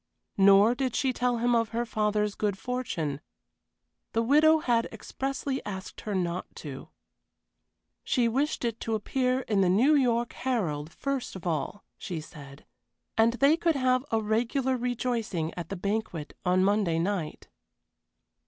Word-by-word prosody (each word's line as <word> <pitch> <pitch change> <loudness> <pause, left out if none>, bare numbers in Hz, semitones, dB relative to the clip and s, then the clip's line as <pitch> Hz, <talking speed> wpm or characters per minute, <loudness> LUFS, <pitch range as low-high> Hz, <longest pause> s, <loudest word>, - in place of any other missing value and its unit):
Nor 200 +3 +7
did 255 -1 -2
she 265 -2 +1
tell 245 -1 0
him 240 +1 +2
of 230 -2 +2
her 235 +1 -2
father's 210 -2 0
good 205 -2 -1
fortune. 175 - -3 0.9
The 230 - +2
widow 305 +6 +5
had 240 -6 +1
expressly 270 +4 -4
asked 190 -2 -7
her 210 -2 -3
not 180 -1 -2
to. 140 -4 -8 1.1
She 245 -3 +2
wished 270 +3 0
it 230 -1 -2
to 225 - -1
appear 255 +4 0
in 210 -5 +1
the 185 - +3
New 240 +12 +4
York 240 -4 +2
Herald 170 - -2
first 275 -1 -3
of 185 - -9
all, 170 +4 -2 0.2
she 175 -4 -4
said. 145 -3 -12 0.5
And 225 +1 +4
they 275 +5 +4
could 335 -1 +1
have 255 -1 +2
a 225 - +1
regular 245 +5 0
rejoicing 235 -9 -2
at 170 -2 -6
the 195 - -3
banquet 200 -5 -3
on 185 0 +3
Monday 200 -4 +2
night. 175 -2 -2
225 Hz, 150 wpm, -28 LUFS, 190-255 Hz, 1.1 s, Nor